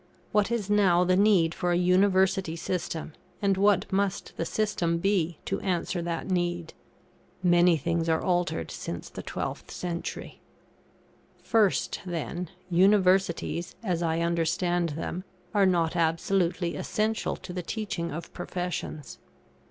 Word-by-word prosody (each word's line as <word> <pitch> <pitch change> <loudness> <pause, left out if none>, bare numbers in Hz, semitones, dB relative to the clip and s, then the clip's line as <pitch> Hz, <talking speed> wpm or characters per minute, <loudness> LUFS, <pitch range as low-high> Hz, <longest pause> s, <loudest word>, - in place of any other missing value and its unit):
What 210 0 +2
is 235 -5 -1
now 195 -4 +4
the 180 0 +3
need 190 -5 +4
for 175 0 -1
a 175 - +3
University 190 -1 +3
system, 165 -2 -3 0.3
and 200 -1 +2
what 200 -1 +3
must 195 -1 -1
the 165 - -2
system 180 -6 0
be 175 -3 +1
to - - -1
answer 180 -1 -1
that 170 -1 -3
need? 175 -2 -1 0.7
Many 175 -1 +5
things 165 +2 -1
are 160 0 +3
altered 175 - 0
since - - -6
the - - -6
12th - - -5
century. 170 -1 -5 1.0
First, 215 -4 +2
then, 175 -1 -4 0.2
Universities, 185 -2 +3
as 180 -5 -1
I 165 0 0
understand 170 +1 +1
them, 180 +2 -4 0.3
are 200 -2 +4
not 170 -2 +1
absolutely 170 +1 +1
essential 215 +1 -1
to 180 - -9
the 180 - -3
teaching 180 -3 -3
of 165 +3 -7
professions. 175 -4 -5
180 Hz, 130 wpm, -27 LUFS, 170-190 Hz, 1.0 s, Many